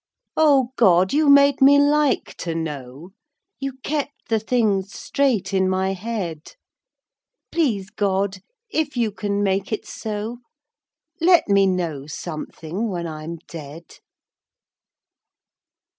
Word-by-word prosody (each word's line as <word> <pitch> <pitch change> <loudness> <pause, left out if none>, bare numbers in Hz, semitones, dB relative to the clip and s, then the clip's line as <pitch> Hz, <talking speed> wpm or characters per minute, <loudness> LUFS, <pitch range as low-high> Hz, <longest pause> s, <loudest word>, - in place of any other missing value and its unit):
O 275 -5 +4
God, 185 -4 +4
you 300 0 +3
made 280 0 +6
me 280 +1 +7
like 290 -1 +2
to 165 -2 -4
know, 150 0 -6 0.5
You 275 -1 -3
kept 290 -1 -4
the 225 -1 +2
things 210 -4 0
straight 255 -9 0
in 190 -1 +2
my 190 +1 0
head, 185 -6 -5 1.0
Please 215 - 0
God, 195 -1 -1 0.3
if 310 -6 -1
you 230 -3 +1
can 205 0 -2
make 195 +1 0
it 215 - -3
so, 220 +2 -5 0.8
Let 345 +1 +5
me 200 -1 +4
know 165 -7 -2
something 165 +6 -5
when 175 -3 -3
I'm 160 +1 -6
dead. 160 0 -10
200 Hz, 115 wpm, -22 LUFS, 175-265 Hz, 1.0 s, me